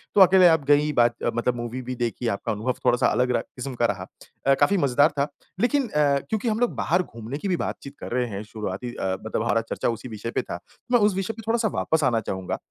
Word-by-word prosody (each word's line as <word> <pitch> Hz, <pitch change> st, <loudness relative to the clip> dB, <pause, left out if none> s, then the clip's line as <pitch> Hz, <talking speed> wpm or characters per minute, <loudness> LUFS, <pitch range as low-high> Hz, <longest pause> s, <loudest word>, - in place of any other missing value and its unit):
तो 205 Hz, -, +7 dB
अकेले 185 Hz, -1 st, +8 dB
आप 160 Hz, -3 st, +4 dB
गई 150 Hz, +1 st, +4 dB
बात 120 Hz, -2 st, +3 dB, 0.2 s
मतलब 120 Hz, +1 st, 0 dB
मूवी 120 Hz, +1 st, -4 dB
भी 125 Hz, 0 st, -5 dB
देखी, 120 Hz, 0 st, -2 dB
आपका 100 Hz, -3 st, -1 dB
अनुभव 110 Hz, +5 st, -1 dB
थोड़ा-सा 120 Hz, -, +4 dB
अलग 125 Hz, 0 st, +1 dB
रहा -, -, +1 dB
किस्म 130 Hz, +1 st, -7 dB
का 120 Hz, -, +2 dB
रहा। 100 Hz, -4 st, -2 dB, 0.4 s
अ, 135 Hz, -, +7 dB
काफ़ी 200 Hz, -, +4 dB
मज़ेदार 145 Hz, -1 st, +4 dB
था 140 Hz, -, +2 dB, 0.3 s
लेकिन 260 Hz, +4 st, +2 dB
अ, 145 Hz, -4 st, +2 dB
क्योंकि 220 Hz, +1 st, -1 dB
हम 215 Hz, 0 st, 0 dB
लोग 245 Hz, -1 st, +1 dB
बाहर 180 Hz, +3 st, +1 dB
घूमने 115 Hz, -1 st, -7 dB
की 175 Hz, -, -4 dB
भी 180 Hz, -2 st, +1 dB
बातचीत 140 Hz, +1 st, -6 dB
कर -, -, -7 dB
रहे 125 Hz, 0 st, 0 dB
हैं 100 Hz, 0 st, -5 dB
शुरुआती 110 Hz, +2 st, -5 dB
अ, 95 Hz, 0 st, -1 dB
मतलब 110 Hz, -, -1 dB
हमारा 115 Hz, -1 st, +2 dB
चर्चा -, -, -1 dB
उसी 115 Hz, +1 st, -4 dB
विषय 110 Hz, +1 st, -5 dB
पे -, -, 0 dB
था 85 Hz, -, -6 dB, 0.3 s
मैं 245 Hz, -, +5 dB
उस 205 Hz, -2 st, +3 dB
विषय 195 Hz, +3 st, -2 dB
पे 225 Hz, -, -10 dB
थोड़ा-सा 225 Hz, 0 st, +2 dB
वापस 160 Hz, -1 st, +1 dB
आना 120 Hz, -4 st, +3 dB
चाहूँगा। 95 Hz, -1 st, -3 dB
125 Hz, 240 wpm, -25 LUFS, 115-180 Hz, 0.4 s, अकेले